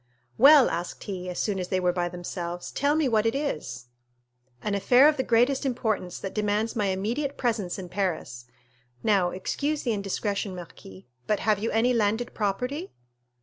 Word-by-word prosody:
"Well," 280 +1 +8
asked 175 +1 -4
he, 185 -2 -5
as 180 - -5
soon 205 -3 -1
as 180 - -3
they 185 - 0
were 180 -1 +1
by 175 -1 -1
themselves, 175 0 -6
"tell 285 +2 +1
me 310 -3 +2
what 220 -2 +2
it 225 - 0
is?" 150 - -3 0.8
"An 210 - -1
affair 245 +7 +5
of 305 - +3
the 265 - 0
greatest 245 +2 +2
importance, 220 -8 -1
that 195 - -6
demands 210 +1 0
my 210 -3 +1
immediate 235 +10 -2
presence 220 -8 -1
in 185 -2 -6
Paris. 175 -10 -3 0.6
Now, 195 -4 +3
excuse 285 +11 -2
the 235 - 0
indiscretion, 200 -1 -2
marquis, 110 - -11 0.2
but 210 - +1
have 215 -2 +2
you 225 - -1
any 235 +3 +2
landed 225 +1 0
property?" 250 - -2
210 Hz, 175 wpm, -26 LUFS, 180-245 Hz, 0.8 s, Well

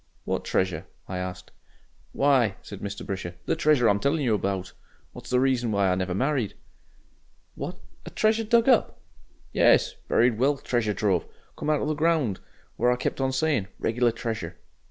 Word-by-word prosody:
"What - - -2
treasure?" 95 -1 -1 0.2
I 90 -1 -4
asked. 90 0 -6 0.6
"Why!" 130 -8 +3
said 100 - -9
Mr. 100 0 -6
Brisher, 95 -3 -5
"the - - +1
treasure 150 -6 +3
I'm 100 -1 +3
telling 140 +5 +1
you 120 -4 +2
about, 95 -3 -2 0.4
what's - - -11
the 125 - +3
reason 125 -3 +1
why 100 -2 +2
I - - +3
never 90 0 -1
married." 130 -1 0 1.0
"What! - - -6 0.3
a - - -8
treasure 220 +1 +1
dug 230 +2 +3
up?" 250 -4 +3 0.5
"Yes - - +4
buried 120 -2 +3
wealth 140 +2 +1
treasure 110 -4 0
trove. 95 -4 +1 0.3
Come - - -4
out 150 -1 +2
of - - -1
the 155 - +1
ground. 150 - +1 0.4
What 120 +1 +3
I - - +2
kept 125 - -3
on 135 0 +1
saying 130 -7 0
regular 120 +1 +1
treasure...." 110 -7 -5
120 Hz, 175 wpm, -26 LUFS, 100-140 Hz, 1.0 s, Yes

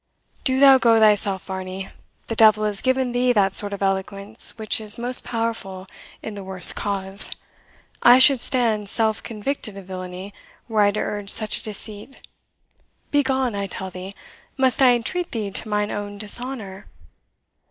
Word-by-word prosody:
"Do 260 0 0
thou 270 -1 +7
go 230 -2 +3
thyself, 205 -3 +2
Varney; 190 0 -7 0.4
the 225 - -5
devil 215 -1 +4
has 210 -2 -2
given 260 -1 0
thee 245 +1 +1
that 195 -3 +1
sort 205 0 0
of 200 0 -5
eloquence 195 +4 -1
which 220 0 0
is 215 -1 +4
most 245 +2 +3
powerful 225 -6 -5 0.4
in 220 - -7
the 200 -1 -9
worst 190 -2 +2
cause. 195 -1 +1 0.7
I 245 +1 +7
should 260 -1 +6
stand 220 -5 -1
self 220 -1 0
convicted 220 -1 -5
of 195 - -11
villainy, 185 +1 -8 0.3
were 220 -2 0
I 205 - +4
to 205 +1 -3
urge 205 -1 -3
such 215 0 +4
a - - -9
deceit. 215 +4 -5 0.9
Begone, 265 -4 0
I 200 -1 -4
tell 190 0 -6
thee; 185 +2 -9 0.4
must 265 0 +1
I 250 -2 +5
entreat 345 +9 -4
thee 215 -4 -4
to 215 - -2
mine 210 0 -1
own 205 0 -6
dishonour?" 210 -2 -6
210 Hz, 165 wpm, -21 LUFS, 195-240 Hz, 0.9 s, thou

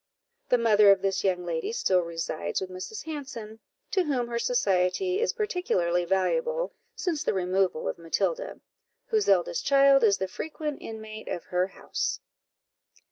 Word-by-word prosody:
The 250 - +5
mother 215 -3 +5
of 195 -1 +5
this 195 -1 0
young 180 -2 0
lady 165 +1 -2
still 190 -5 +2
resides 165 -2 -3
with 190 -1 -5
Mrs. 185 - -6
Hanson, 265 -8 -7 0.3
to 375 -3 +2
whom 250 -5 -1
her 235 0 -1
society 235 - +1
is 470 - +1
particularly 180 - 0
valuable, 485 - 0 0.2
since 330 -5 -2
the - - 0
removal 185 -2 0
of - - -3
Matilda, 480 - -2 0.5
whose 430 -2 +2
eldest - - +2
child 275 -1 +5
is 205 -3 +5
the 190 - -2
frequent 300 +6 -5
inmate 220 -1 -8
of 175 - -4
her 180 +1 0
house. 195 - -3
220 Hz, 150 wpm, -27 LUFS, -, 0.5 s, The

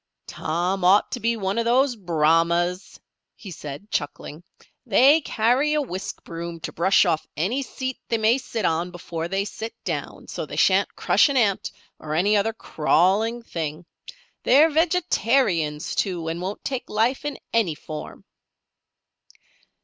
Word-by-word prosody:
"Tom 180 +4 -2
ought 190 +3 +4
to 250 - -3
be 230 0 0
one 195 +1 -1
of 230 - 0
those 250 +2 +3
Brahmas," 170 0 +1 0.4
he 195 - -10
said, 150 +5 -9
chuckling. 145 +1 -4 0.4
"They 265 +7 +5
carry 265 +5 +1
a 300 - +2
whisk 190 -6 -6
broom 170 0 -7
to - - -5
brush 190 +4 +4
off 155 - 0
any 205 - 0
seat 260 -1 -5
they 230 - +1
may 225 +4 +3
sit 230 -5 -4
on 165 +2 0
before 170 -2 -5
they 195 +2 -1
sit 220 +2 -7
down, - - -5
so's - - -5
they - - -7
sha'n't - - +3
crush - - +3
an 280 - 0
ant, 205 -6 +1 0.3
or 155 0 -4
any 200 +6 +3
other 210 +2 +2
crawling 215 +5 +1
thing. 160 -4 -5 0.6
They're 300 +5 +5
vegetarians, 260 - +1
too, 175 -5 -2
and 165 +2 -4
won't 190 +3 -5
take 260 -2 -4
life 230 +6 +1
in 295 -2 -4 0.2
any 210 -9 +2
form." 150 0 -9
200 Hz, 150 wpm, -23 LUFS, 170-240 Hz, 0.6 s, They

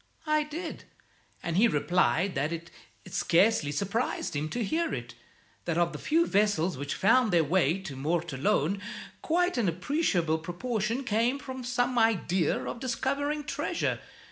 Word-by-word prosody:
"I 305 0 +3
did, 315 +3 -6 0.6
and 170 0 -1
he 230 +4 +6
replied 175 - +2
that 145 +4 -1
it 170 0 -6 0.3
scarcely 185 -1 +2
surprised 200 +4 -2
him 150 +2 -2
to 240 +8 -2
hear 330 +10 0
it, 120 -1 -7 0.5
that 170 -1 -1
of 170 -1 +2
the 150 - -6
few 330 +2 +2
vessels 200 - +2
which 140 +2 -4
found 235 +2 +4
their 170 -2 +4
way 170 +2 +2
to 165 -8 -7
Mortallone, 165 +5 0 0.4
quite 355 -3 +1
an 205 -6 +2
appreciable 175 - 0
proportion 215 - -2
came 240 +4 +1
with 260 -2 -5
some 245 0 +1
idea 190 -6 +2
of 235 - -5
discovering 280 +4 -1
treasure. 295 +4 -2
200 Hz, 145 wpm, -29 LUFS, 165-255 Hz, 0.6 s, he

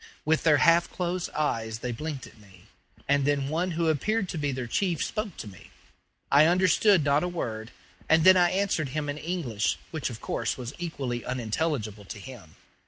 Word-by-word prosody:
With 155 +1 +2
their 155 -3 +4
half 170 +3 +4
closed 180 0 -3
eyes 115 -7 -2
they 125 +2 -4
blinked 145 +2 -5
at - - -16
me, 95 -4 -18 0.4
and 140 0 +3
then 140 -1 0
one 170 +4 0
who 170 -1 +1
appeared 195 +7 0
to - - -4
be 145 -1 0
their 130 -1 -4
chief 175 - 0
spoke 215 -4 -4
to - - -7
me. 95 -3 -13 0.6
I 145 +3 +7
understood 185 +1 +4
not 145 +1 +3
a 180 - -1
word; 115 -10 -4 0.4
and 160 0 +5
then 185 +1 +8
I 175 -1 +4
answered 185 -7 0
him 145 -1 -2
in 145 +1 -4
English, 155 - -1
which, 160 -5 -3
of 115 -3 -8
course, 115 - -2
was 125 0 -6
equally 135 -8 -4
unintelligible 115 -3 -2
to 100 - -8
him. 100 -7 -11
145 Hz, 190 wpm, -27 LUFS, 120-170 Hz, 0.6 s, then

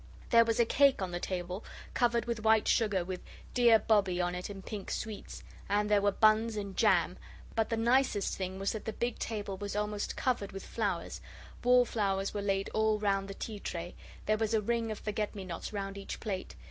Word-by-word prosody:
There 230 -1 +8
was 230 0 0
a 235 - +6
cake 280 +3 +4
on 190 -2 -2
the 175 - -3
table 180 +2 -4 0.3
covered 235 -1 +2
with 235 -2 -2
white 220 -1 +4
sugar, 205 -6 +2
with 185 0 -5 0.3
'Dear 240 -2 +6
Bobbie' 200 -4 +2
on 175 0 0
it 180 +2 -4
in 195 -1 -8
pink 205 -1 -6
sweets, 215 -2 -5 0.3
and 210 +1 +1
there 205 -1 +5
were 205 0 +3
buns 215 +2 +3
and 200 -2 -4
jam; - - +3 0.3
but 225 -1 0
the 230 - 0
nicest 235 -2 +2
thing 190 0 -4
was 195 +1 -1
that 220 - -6
the 220 - -3
big 240 -1 -2
table 205 -3 -3
was 205 0 -5
almost 210 0 -2
covered 230 -7 -1
with 195 - -7
flowers - - -2 0.4
wallflowers 215 -6 +2
were 205 - -2
laid 195 -1 0
all 220 0 +2
round 195 -2 0
the 195 - -7
tea 215 0 -6
tray 175 -2 -5 0.3
there 215 0 +2
was 225 0 +1
a 215 - +2
ring 230 +1 0
of 215 - -3
forget 210 0 -3
me 195 -2 -6
nots 170 -2 -5
round 200 -1 -4
each 195 - -6
plate. 195 -4 -4
210 Hz, 210 wpm, -31 LUFS, 195-225 Hz, 0.4 s, There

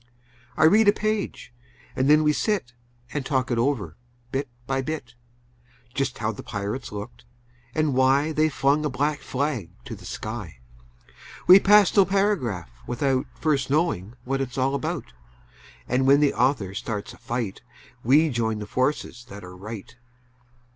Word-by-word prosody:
I 155 - +3
read 205 +7 +6
a - - +9
page, 215 - -3 0.4
and 130 +2 +1
then 155 +1 +6
we 150 0 +3
sit 190 - -1 0.4
And 145 - -2
talk 130 -2 0
it 120 - +1
over, 115 - -1 0.3
bit 135 0 -2 0.2
by 135 +1 0
bit; 130 -4 -5 0.8
Just 135 -1 -1
how 110 0 -1
the 105 - -8
pirates 105 +6 -4
looked, 105 +3 -8 0.5
and 155 -2 +1
why 135 +4 +3
They 155 0 +2
flung 140 +1 +2
a 150 - 0
black 145 +2 -1
flag 135 - -2 0.2
to 125 -4 -6
the 105 - -14
sky. 110 - -6 0.9
We 185 +2 +10
pass 205 0 +5
no 200 - +7
paragraph 190 - 0 0.2
without 130 +1 0
First 150 -4 +1
knowing 135 - 0
what 135 +2 -1
it's 125 -1 -4
all 135 +1 +1
about, 125 - -3 0.7
And 130 +2 +1
when 140 +1 +6
the 145 -1 +3
author 125 -7 +1
starts 105 0 -4
a - - -15
fight 115 -5 -4 0.4
We 150 +7 +5
join 110 -2 0
the 105 - -5
forces 130 0 -1
that 100 0 -9
are 90 0 -10
right. 110 +4 -9
130 Hz, 160 wpm, -25 LUFS, 115-150 Hz, 0.9 s, We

